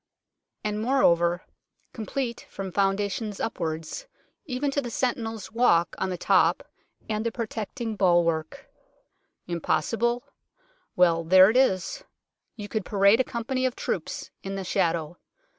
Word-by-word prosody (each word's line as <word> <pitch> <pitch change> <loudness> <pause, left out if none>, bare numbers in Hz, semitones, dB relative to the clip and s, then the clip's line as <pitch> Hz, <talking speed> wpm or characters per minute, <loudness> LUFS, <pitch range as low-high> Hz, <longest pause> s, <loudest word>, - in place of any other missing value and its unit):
And, 210 0 -2
moreover, 175 -9 +3 0.5
complete 235 +2 -4
from 195 -1 -6
foundations 200 +2 0
upwards, 165 - -4 0.4
even 275 +1 -1
to 285 - 0
the 245 - -5
sentinel's 225 -3 -2
walk 195 -8 +3
on 190 - 0
the 180 - -3
top - - +3 0.4
and 215 0 -1
the 230 - -1
protecting 225 0 -4
bulwark. 175 - +1 0.8
Im 170 -1 -4
possible? 235 +12 0 0.7
Well, 170 -2 +4
there 185 +4 +7
it - - -6
is. 265 - +1 0.5
You 205 -3 -7
could 215 0 -2
parade 200 +3 +4
a - - +4
company 250 +2 -3
of 250 - -4
troops - - -4
in 195 0 -5
the 195 - -3
shadow. 170 -3 0
205 Hz, 130 wpm, -26 LUFS, 180-235 Hz, 0.8 s, there